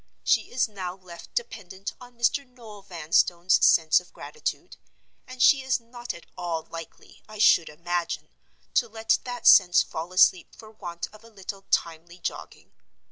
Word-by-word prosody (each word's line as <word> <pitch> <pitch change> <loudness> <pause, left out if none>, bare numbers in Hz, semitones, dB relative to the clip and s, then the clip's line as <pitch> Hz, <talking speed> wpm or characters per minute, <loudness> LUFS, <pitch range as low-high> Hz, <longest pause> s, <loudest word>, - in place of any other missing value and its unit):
She - - +2
is 245 -1 +1
now 185 -4 -6
left 180 -3 -13
dependent 200 - -5
on 245 -1 -14
Mr. 235 +4 +1
Noel 235 -5 -14
Vanstone's 175 0 +1
sense 160 -1 +5
of 180 - -18
gratitude; 465 - -6 0.5
and 255 0 -2
she 275 -2 +6
is 260 -1 0
not 240 +1 -8
at 170 - -12
all 165 -2 -3
likely, 165 0 -11
I 215 - -10
should 175 -5 +5
imagine, 170 +2 -3 0.4
to 235 - +2
let 225 0 +1
that 245 -1 -6
sense 180 -3 +7
fall 165 +3 -6
asleep 185 0 +3
for 220 -1 -14
want 175 -5 -6
of 215 +1 -16
a 230 - -15
little 195 -2 -9
timely 170 +1 -1
jogging. 175 - -7
195 Hz, 160 wpm, -26 LUFS, 175-235 Hz, 0.5 s, sense